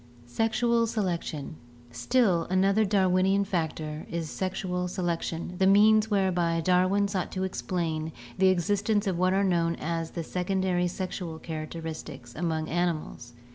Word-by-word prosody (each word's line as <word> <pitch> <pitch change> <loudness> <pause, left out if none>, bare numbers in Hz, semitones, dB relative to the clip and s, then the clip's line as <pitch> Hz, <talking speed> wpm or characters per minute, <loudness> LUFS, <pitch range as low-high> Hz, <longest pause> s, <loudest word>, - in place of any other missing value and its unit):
Sexual 230 - +1
Selection. 170 -8 -3 0.2
— 120 - -23
Still 200 - +2
another 195 +3 +3
Darwinian 190 0 +2
factor 160 -5 -3
is 165 -2 -4
sexual 185 -1 -2
selection, 175 -1 -3
the 190 - +4
means 215 +2 +5
whereby 180 -5 +1
Darwin 185 +4 +3
sought 195 -3 -3
to 185 - -2
explain 165 -4 -2 0.3
the 190 - +5
exist 190 +3 +1
ence 210 -1 +2
of 185 -3 -1
what 185 +1 +3
are 195 +1 +2
known 170 -3 +1
as 165 0 -3
the 170 - -5
secondary 180 0 0
sexual 175 -2 -5
characteristics 155 -6 -7
among 160 -1 -1
animals. 160 -8 -2
180 Hz, 135 wpm, -28 LUFS, 165-195 Hz, 0.3 s, means